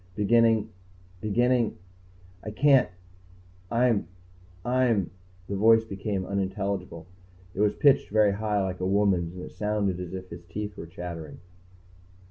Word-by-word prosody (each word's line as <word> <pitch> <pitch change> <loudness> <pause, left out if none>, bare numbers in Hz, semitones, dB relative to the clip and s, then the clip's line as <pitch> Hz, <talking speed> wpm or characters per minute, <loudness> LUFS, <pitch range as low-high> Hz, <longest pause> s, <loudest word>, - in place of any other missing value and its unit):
Beginning 110 0 +3 0.5
beginning... 120 +2 +1 0.7
I - - -5
can't 135 +3 +4 0.8
I'm 115 -6 +2 0.6
I'm 120 -8 +1 0.2
" 90 0 -28
The 100 - -3
voice 110 +3 +5
became 100 -2 -4
unintelligible. 100 -3 -3 0.5
It - - -8
was 105 0 +2
pitched 140 -2 +4
very 105 -1 +4
high, 105 0 -1
like 95 -1 -4
a 90 - -2
woman's, 95 -4 +1
and 90 - -7
it - - -9
sounded 105 -3 -1
as 90 0 -6
if 95 0 -8
his 85 +1 -9
teeth 105 +3 -6
were 85 - -8
chattering. 85 -3 -7
100 Hz, 135 wpm, -27 LUFS, 95-110 Hz, 0.8 s, voice